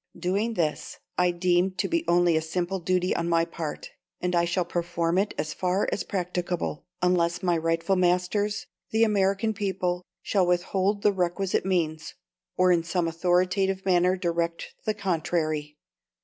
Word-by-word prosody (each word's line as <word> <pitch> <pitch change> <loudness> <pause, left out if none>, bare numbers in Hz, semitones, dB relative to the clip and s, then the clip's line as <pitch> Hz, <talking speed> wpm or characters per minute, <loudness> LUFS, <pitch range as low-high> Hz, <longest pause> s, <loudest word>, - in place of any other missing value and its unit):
Doing 205 +6 -1
this 155 -5 -2 0.2
I 180 0 +3
deem 175 +1 +1
to - - 0
be 335 -1 0
only 175 -1 +4
a 160 - +2
simple 175 +4 -2
duty 180 +1 +1
on 170 0 -1
my 165 0 +3
part; 165 -2 -6 0.3
and 180 0 -1
I 170 0 +3
shall 175 +1 0
perform 170 0 0
it 205 +1 -1
as 150 +1 -2
far 185 +2 0
as - - -1
practicable, 180 -4 -3 0.2
unless 175 0 +2
my 175 -2 +2
rightful 165 +3 +1
masters, 180 +4 +1 0.2
the 220 +1 +3
American 205 0 +2
people, 185 -3 -2 0.2
shall 190 -4 +2
withhold 190 +3 +1
the 205 - +4
requisite 185 +1 0
means, 160 -4 -1 0.4
or 185 0 +5
in 170 -1 +4
some 170 +1 -1
authoritative 185 +3 +1
manner 180 0 +3
direct 170 -2 -2
the 215 - 0
contrary." 155 -5 -1
180 Hz, 155 wpm, -26 LUFS, 170-190 Hz, 0.4 s, or